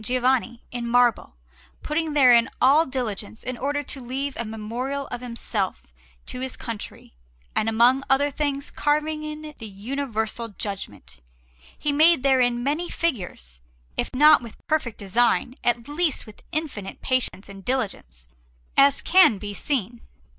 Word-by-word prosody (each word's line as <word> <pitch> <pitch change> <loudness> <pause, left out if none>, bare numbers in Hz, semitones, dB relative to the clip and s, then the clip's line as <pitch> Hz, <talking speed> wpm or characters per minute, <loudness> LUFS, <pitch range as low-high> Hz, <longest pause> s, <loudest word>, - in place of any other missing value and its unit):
Giovanni, 250 0 0
in 240 -1 -4
marble, 240 - +2 0.5
putting 310 0 -1
therein 250 -4 +6
all 295 +5 +5
diligence 220 -5 -4
in 255 +1 -4
order 285 +3 -2
to 275 -1 -6
leave 265 +3 -3
a 235 - -3
memorial 235 +6 -4
of 240 - -5
himself 230 -5 -3 0.4
to 250 - -6
his 260 0 -4
country; 230 - -7 0.4
and 220 - +1
among 240 +4 +4
other 285 +2 +3
things, 280 -1 -2
carving 305 +1 0
in 305 0 -6
it 305 - -11
the 225 - -6
Universal 220 0 -4
Judgment, 195 - -6 0.6
he 295 - 0
made 310 0 +5
therein 250 -3 +3
many 305 +6 -1
figures, 175 - -3 0.3
if - - -1
not 300 +2 +7
with 235 -3 -10
perfect 305 -8 0
design, 240 +5 +1
at 240 -1 0
least 305 +1 0
with 215 -2 -14
infinite 295 - -4
patience 255 -6 0
and 195 -1 -11
diligence, 185 - -3 0.5
as 280 0 +5
can 365 - +6
be 205 +1 -6
seen. 240 -1 -3
250 Hz, 145 wpm, -24 LUFS, 220-285 Hz, 0.6 s, not